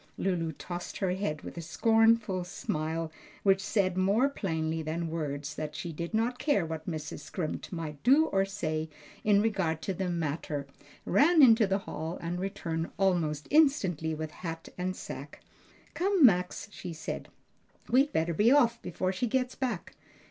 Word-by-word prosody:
Lulu 170 -4 0
tossed 175 +4 -6
her 190 -2 0
head 180 -5 -2
with - - -8
a - - -3
scornful 225 +1 +3
smile 160 -1 -3 0.3
which 195 -1 +4
said 190 -3 +1
more 200 +8 +3
plainly 160 - -2
than 160 +1 -3
words 145 -2 -3
that 150 0 -5
she 170 - -5
did 170 +2 -5
not 235 +3 0
care 270 - +2
what 160 +1 -5
Mrs. 155 -3 -5
Scrimp 160 +2 -5
might 160 -5 -5
do 280 +6 +5
or 195 -9 +2
say 160 -5 -3 0.3
in 205 -1 +4
regard 190 -8 0
to 195 - -1
the 185 0 -2
matter, 155 -3 -2 0.4
ran 315 +1 +5
into 225 -4 +7
the 195 0 +2
hall, 160 +3 -4
and 170 +1 -3
returned 170 -4 -3
almost 170 -6 +1
instantly 190 - +3
with 155 0 -5
hat 165 0 -6
and 185 +1 -2
sacque. - - -8 0.5
"Come, 375 -4 +4
Max," 180 -3 +2
she 180 -4 -7
said, 160 -1 -5 0.6
"we'd 270 +5 +4
better 165 - +1
be 210 +9 +4
off 235 -5 +4
before 185 +2 -2
she 240 +6 -1
gets 255 +2 0
back. 240 -9 -3
180 Hz, 165 wpm, -30 LUFS, 160-220 Hz, 0.6 s, into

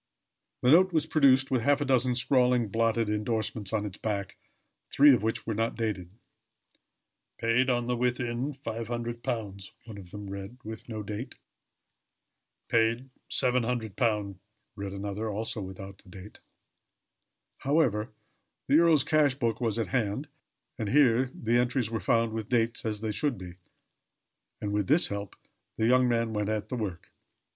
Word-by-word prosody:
The 125 - +5
note 185 +4 +6
was 160 -3 +1
produced, 135 -4 +4
with 130 -3 +2
half 145 +4 +3
a 145 - -1
dozen 130 -2 +2
scrawling, 125 -2 +2
blotted 115 +1 +1
indorsements 105 -1 -2
on 105 -2 -1
its 100 -2 -7
back, 100 -3 -3 0.5
three 145 0 +7
of 120 - +2
which 110 +1 -2
were 110 - -2
not 115 +2 -1
dated. 105 -6 -3 1.3
"Paid 115 +3 +2
on 120 -1 +1
the 125 0 0
within 125 +2 -1
£500," 115 -4 -4
one 110 -3 -9
of 90 -3 -12
them 105 +2 -8
read 100 +4 -7
with 110 +2 -8
no 110 -2 -4
date. 105 +5 -6 1.3
"Paid 115 +3 +1 0.2
£700," 115 -5 0 0.4
read 100 -1 -5
another, 100 +2 -4
also 110 +1 -3
without 95 0 -9
date. 95 +3 -12 1.2
However, 130 -7 +1 0.6
the 145 +3 +5
earl's 165 -5 +5
cash 150 -4 +3
book 115 -4 -1
was 115 -2 0
at 115 - -2
hand, 125 +3 -1 0.5
and 110 -2 -2
here 130 -2 +4
the 120 0 +1
entries 120 -2 0
were 115 - -1
found 115 0 +1
with 110 -2 -4
dates, 115 -2 0
as 105 -1 -2
they 110 -1 -2
should 135 +3 -1
be; 90 -2 -9 1.1
and 105 -1 -3
with 105 -2 0
this 155 +5 +4
help 100 -1 -5 0.4
the 110 - +1
young 125 +1 +4
man 115 -1 0
went 105 -1 -1
at 110 -1 -2
the 130 - -3
work. 100 -7 -5
115 Hz, 150 wpm, -28 LUFS, 105-125 Hz, 1.3 s, three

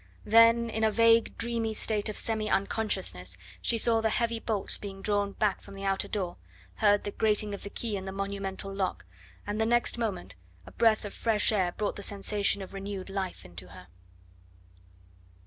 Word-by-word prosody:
Then 230 +1 +6
in 220 0 -1
a 220 - +5
vague, 230 +1 +4
dreamy 230 -1 -1
state 215 0 0
of 210 - -4
semi 220 -1 -1
unconsciousness 190 - -1 0.2
she 230 - +2
saw 225 0 +3
the 220 - +2
heavy 230 +1 0
bolts 215 -4 0
being 195 -1 -8
drawn 205 -1 0
back 205 -2 0
from 200 - -12
the 195 - -8
outer 195 0 0
door, 185 -4 -3 0.4
heard 205 -1 +4
the 205 - -4
grating 210 -1 +1
of 200 - -6
the 200 - -6
key 220 +1 -3
in 190 -1 -5
the 190 - -4
monumental 195 0 -4
lock, 185 - -2 0.4
and 210 +2 -2
the - - +3
next 240 0 +2
moment 185 - -3 0.3
a - - -12
breath 220 -2 +3
of 205 - -6
fresh 220 -2 +2
air 190 -4 +1
brought 210 - -2
the - - -6
sensation 200 0 -1
of 190 - -11
renewed 195 -1 -6
life 190 - -4
into 90 +1 -10
her. 90 -1 -13
205 Hz, 185 wpm, -29 LUFS, 195-220 Hz, 0.4 s, Then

